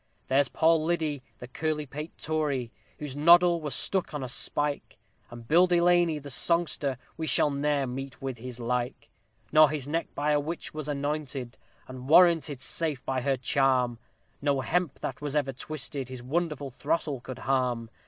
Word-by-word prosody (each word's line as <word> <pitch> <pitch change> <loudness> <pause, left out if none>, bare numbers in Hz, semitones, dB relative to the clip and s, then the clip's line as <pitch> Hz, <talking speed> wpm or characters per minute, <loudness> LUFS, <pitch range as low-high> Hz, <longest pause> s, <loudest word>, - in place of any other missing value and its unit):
There's 135 0 +3
PAUL 160 -1 +3
LIDDY, 155 -4 -1 0.2
the 125 - -9
curly 150 +3 -2
pate 150 +4 -8
Tory, 145 -6 -2 0.3
whose 145 -3 -6
noddle 170 +3 +5
was 150 -2 -1
stuck 185 -5 +1
on 145 - -3
a - - -4
spike, 145 +3 0 0.3
And 120 -1 -11
BILLY 175 +4 +4
DELANEY, 175 -2 +3
the 145 -1 -8
"Songster," 150 -3 +1 0.2
we 160 - -3
never - - -2
shall 150 - +5 0.4
meet 135 +1 -6
with 135 -3 -5
his 125 0 -7
like; 120 +1 -3 0.4
For 155 -1 +7
his 145 -3 -3
neck 165 +3 -1
by 150 +1 0
a 150 - +3
witch 160 +4 -5
was 155 -1 -5
anointed, 140 -3 -3 0.3
and 130 +1 -9
warranted 165 -5 +5
safe 155 -4 -1
by 130 -1 -1
her 135 +1 0
charm, 130 -2 +1 0.4
No 140 -2 +1
hemp 175 +1 -1
that 135 - -5
was 145 0 -4
ever 145 -2 +1
yet 135 0 -8
twisted 145 -4 -4
his 130 -2 -8
wonderful 150 -1 -2
throttle 145 0 -2
could 130 0 -8
harm. 125 -4 -1
145 Hz, 175 wpm, -28 LUFS, 130-155 Hz, 0.4 s, For